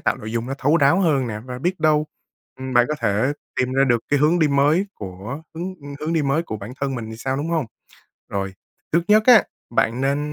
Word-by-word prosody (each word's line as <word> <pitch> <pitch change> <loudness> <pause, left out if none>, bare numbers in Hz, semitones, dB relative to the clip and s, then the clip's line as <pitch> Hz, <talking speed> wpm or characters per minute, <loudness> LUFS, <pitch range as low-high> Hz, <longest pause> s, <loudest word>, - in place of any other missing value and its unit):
tạo - - 0
nội 110 +1 -7
dung 115 +1 -2
nó 135 - -3
thấu 150 +5 +3
đáo 145 +4 +4
hơn 145 -8 +2
nè, 105 -2 -5
và 125 -1 -6
biết 180 +6 -2
đâu, 155 -1 +3 0.5
ừm, 130 0 -5
bạn 120 0 +6
có 150 - 0
thể 110 +8 +1 0.3
tìm 130 0 0
ra 135 +1 +3
được 120 -3 +1
cái 145 - +2
hướng 155 +4 +3
đi 155 -3 +3
mới 145 +7 +3
của 105 - -7
hướng, 180 +3 -5
ưm, 145 0 -8
hướng 160 +2 -2
đi 160 -3 +1
mới 140 +4 +1
của 110 -10 -5
bản 105 +4 -8
thân 140 -1 -1
mình 110 -3 -5
thì 110 - -7
sao, 130 +3 -2
đúng 150 +4 -3
hông? 160 -7 0 0.6
Rồi, 95 -1 -3 0.4
trước 170 +1 +3
nhất 215 +1 +6
á, 240 -5 +8 0.3
bạn 115 +1 +1
nên 140 +1 +1
140 Hz, 245 wpm, -22 LUFS, 120-155 Hz, 0.6 s, á